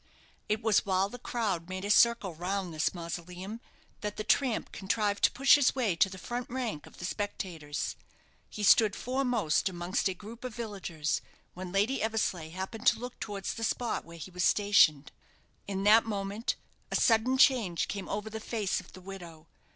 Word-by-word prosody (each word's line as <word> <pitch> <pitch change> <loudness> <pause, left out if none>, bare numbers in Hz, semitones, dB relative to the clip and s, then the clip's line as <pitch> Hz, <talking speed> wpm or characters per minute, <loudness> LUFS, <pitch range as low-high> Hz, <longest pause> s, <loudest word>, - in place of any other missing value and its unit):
It 215 +2 0
was 220 -3 +4
while 190 0 +1
the 245 - -9
crowd 200 -9 -2
made 185 +1 -4
a 205 - +1
circle 235 -5 +4
round 180 +2 -3
this 155 -1 +1
mausoleum 180 +5 -6 0.4
that 210 0 -4
the 215 - -2
tramp 245 +2 +1
contrived 205 +1 -1
to - - +3
push 275 +1 +5
his 285 -3 +5
way 230 -9 +1
to 195 - +4
the 190 - -9
front 240 +6 -5
rank 240 - -3
of - - -16
the 175 - -6
spectators. 175 -7 -4 0.5
He 210 - -6
stood 210 0 +6
foremost 245 - +1
amongst 175 +2 -1
a 190 - -2
group 225 +5 -11
of 250 -3 -5
villagers, 190 -9 -3 0.3
when 180 0 -7
Lady 205 +8 +1
Eversleigh 215 -7 -1
happened 190 +6 -5
to 225 - +5
look 245 +1 -7
towards 200 -2 -4
the 225 - -6
spot 240 +1 -1
where 170 0 -12
he 175 +3 -8
was 180 0 -2
stationed. 180 -10 +4 0.6
In 195 -1 -2
that 215 +2 +7
moment 205 +1 -2 0.3
a - - -2
sudden 235 +3 +3
change 245 - +4
came 200 -2 -5
over 210 +1 -3
the 220 - -4
face 215 -3 -1
of - - -14
the 185 - -11
widow. 175 -4 -10
205 Hz, 180 wpm, -30 LUFS, 180-225 Hz, 0.6 s, that